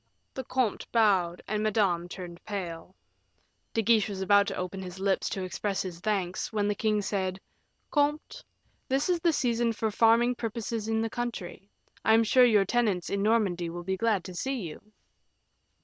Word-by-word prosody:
The 265 - -5
comte 255 -4 -1
bowed, 190 -6 +2
and 210 0 -1
Madame 195 -5 +1
turned 175 -2 -9
pale. 185 -3 -6 0.8
De 225 - 0
Guiche 220 -1 +3
was 195 -2 -5
about 200 +1 +4
to - - -3
open 185 +1 -4
his 185 0 -8
lips 195 0 0
to 190 - -3
express 195 +2 -2
his 180 -3 -7
thanks, 190 -3 -2
when 210 -2 0
the 205 - +1
king 210 -1 0
said, 190 -1 -2 0.5
"Comte, 295 +1 0 0.5
this 270 +6 +1
is 355 -1 +2
the 335 0 +3
season 235 -5 +1
for 220 0 -2
farming 230 +3 +4
purposes 230 -1 -4
in 225 0 +1
the 225 - -1
country; 210 -6 -5 0.3
I 220 - +5
am 225 - +5
sure 250 +3 +5
your 210 -5 +4
tenants 205 -5 0
in 200 - 0
Normandy 200 -6 +1
will 175 +1 -6
be 190 +2 -1
glad 205 -2 +1
to 185 - -8
see 265 +7 -2
you." 165 -5 -7
210 Hz, 180 wpm, -28 LUFS, 185-230 Hz, 0.8 s, I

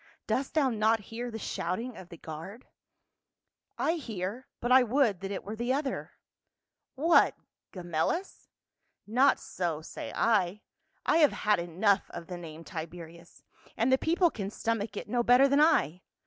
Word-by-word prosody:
Dost 270 +3 -2
thou 280 -4 +3
not 220 0 +2
hear 240 +2 -4
the 225 - -6
shouting 225 +4 -3
of 180 -2 -11
the 170 - -10
guard?" 165 +11 -9 0.6
" - - -59 0.3
I 330 +2 +1
hear; 220 - -5
but 240 - -2
I 260 +1 +8
would 245 -5 +2
that 195 0 -5
it 200 - -4
were 210 +2 -6
the 240 +3 -1
other." 275 0 -3 0.8
"What 325 +5 +4 0.4
Gemellus? 175 - -3 0.6
Not 250 +6 +3
so, 165 -4 -3
say - - -7
I. 210 -3 +1 0.4
I - - +3
have 305 -3 +5
had 210 -3 +4
enough 190 +4 +1
of 170 - -8
the 180 +1 -7
name 165 -1 -9
Tiberius, 170 +1 -9 0.3
and 235 +4 +2
the 260 - +6
people 340 +1 +2
can 200 -3 -4
stomach 220 -1 -2
it - - -5
no 240 +3 +1
better 250 +3 +6
than 280 +2 +3
I. 180 - +3
215 Hz, 160 wpm, -29 LUFS, 175-255 Hz, 0.8 s, I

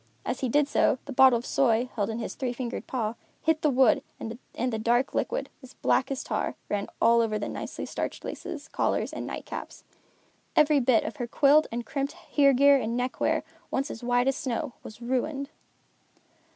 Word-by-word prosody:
As - - -2
he 260 - -1
did 290 +3 +3
so, 280 - +3
the 280 - -6
bottle 260 -1 +7
of 235 - -7
soy, 240 -2 +2
held 205 -2 0
in 220 - -3
his 230 - -4
three 250 -2 -3
fingered 245 -1 -5
paw, 225 -4 -2 0.3
hit 320 -1 +1
the 305 - +3
wood 260 -3 +4 0.2
and 235 +1 -5
the 220 - -1
dark 240 +4 +1
liquid, - - -1
as 260 - -14
black 260 - +1
as 270 -1 -3
tar, - - -2
ran 205 -1 -1
all 235 0 +5
over 215 -2 0
the 205 - -3
nicely - - -5
starched - - -4
laces, 325 -5 -6
collars - - -1
and - - -5
nightcaps. - - -7 0.7
Every 300 -1 +5
bit 245 -3 +3
of - - -5
her 245 -3 -3
quilled 290 +5 +4
and 235 +1 -3
crimped 275 +2 -2
hear 280 -2 +3
gear 280 +2 +6
and 230 -2 -2
neckwear, 250 +1 0 0.3
once 275 +3 -1
as 225 - -8
white 245 +1 +2
as 270 - +2
snow, 245 -1 -3
was 220 +2 -11
ruined. 275 +3 -2
255 Hz, 190 wpm, -27 LUFS, 235-280 Hz, 0.7 s, bottle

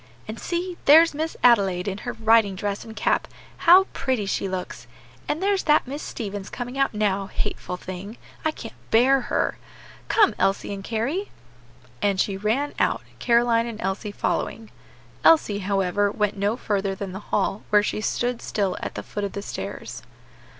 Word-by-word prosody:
And 215 +1 -6
see, 350 0 -3
there's 320 +3 +7
Miss 315 +2 -3
Adelaide 195 -7 +4
in 195 0 -3
her 245 - -5
riding 220 -3 +3
dress 200 +1 -3
and 220 -1 -10
cap; - - +1 0.4
how 370 +2 +10
pretty 260 -6 -1
she 195 0 -1
looks! 180 -10 -5 0.4
And 320 +5 -2
there's 395 -1 +2
that 300 -1 +4
Miss 280 +4 -6
Stevens 205 -4 -5
coming 245 +1 -6
out 275 -5 +1
now; 200 -2 0
hateful 180 -1 -4
thing! 185 +5 -8 0.3
I 315 - +2
can't 230 -7 -7 0.2
bear 260 +4 +5
her! - - 0 0.5
Come, 425 -3 +4
Elsie 195 +2 +1
and 195 -1 -7
Carry!" 255 - -2 0.7
And 200 -2 +1
she 195 - +1
ran 225 +9 -1
out, - - +1 0.2
Caroline 235 -1 +3
and 225 -2 -7
Elsie 195 +2 -3
following. 220 +1 -2 0.5
Elsie, 220 -11 +5
however, 195 0 +1
went 210 -1 0
no 205 +3 0
further 200 -4 -1
than 195 -1 -5
the 190 - -6
hall, 205 0 -1
where 210 -1 +5
she 215 - -2
stood 245 +2 -1
still 195 -3 -1
at - - -5
the - - -5
foot 205 - -5
of 200 - -3
the 200 - -5
stairs. - - -6
215 Hz, 170 wpm, -24 LUFS, 195-250 Hz, 0.7 s, how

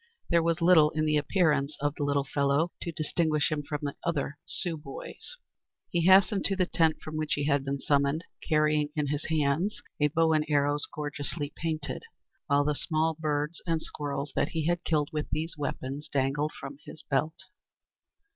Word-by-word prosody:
There 170 -1 +5
was 165 0 0
little 165 -4 +7
in 155 0 -1
the 150 -1 +3
appearance 150 -2 +1
of 145 0 0
the 150 - -3
little 140 -1 +1
fellow 140 +4 +1
to 170 - -3
distinguish 155 -2 +1
him 150 -1 0
from 145 0 -4
the 140 -1 -3
other 145 -3 -2
Sioux 175 -3 -1
boys. 150 - -8 0.6
He 170 0 +2
hastened 195 +1 +6
to 195 - +2
the 185 -1 +2
tent 160 -2 +2
from 155 0 -5
which 155 -1 0
he 145 - -1
had 140 -2 +2
been 140 0 -2
summoned, 140 +2 +1 0.3
carrying 150 -1 +3
in 150 -2 0
his 145 +1 -2
hands 160 +5 +1 0.2
a 150 - +4
bow 160 +1 +2
and 155 -1 +3
arrows 145 0 +2
gorgeously 145 0 -3
painted, 155 -2 -3 0.5
while 145 0 +4
the 150 +1 +1
small 160 +2 0
birds 150 0 -2
and 165 -1 +2
squirrels 145 -2 -4
that - - +1
he 160 -2 -2
had 175 +1 0
killed 150 -3 +1
with 150 -1 -2
these 160 +2 -2
weapons 145 0 -4
dangled 140 +2 0
from 140 +1 -8
his 155 - -10
belt. 155 +3 0
150 Hz, 185 wpm, -29 LUFS, 145-160 Hz, 0.6 s, little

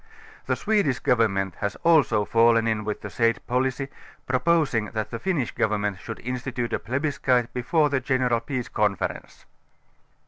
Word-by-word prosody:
The - - +1
Swedish 205 - +1
Grovernment 95 -6 +1
has 100 0 -2
also 145 -11 +4
fallen 115 0 +4
in 110 -1 0
with 105 0 -4
the 105 - -6
said 115 +5 +1
policy, 130 +2 -1 0.4
proposing 130 -3 +2
that 110 -1 -2
the 115 - -4
T'innish 170 -10 -1
Government 105 -3 -1
should 110 - -7
institute 125 0 -3
a - - 0
plebiscite 130 -2 0
before 150 +4 +1
the 140 - +2
general 125 -2 +1
peace 125 +1 -4
conference. 100 -4 -2
120 Hz, 145 wpm, -25 LUFS, 110-135 Hz, 0.4 s, also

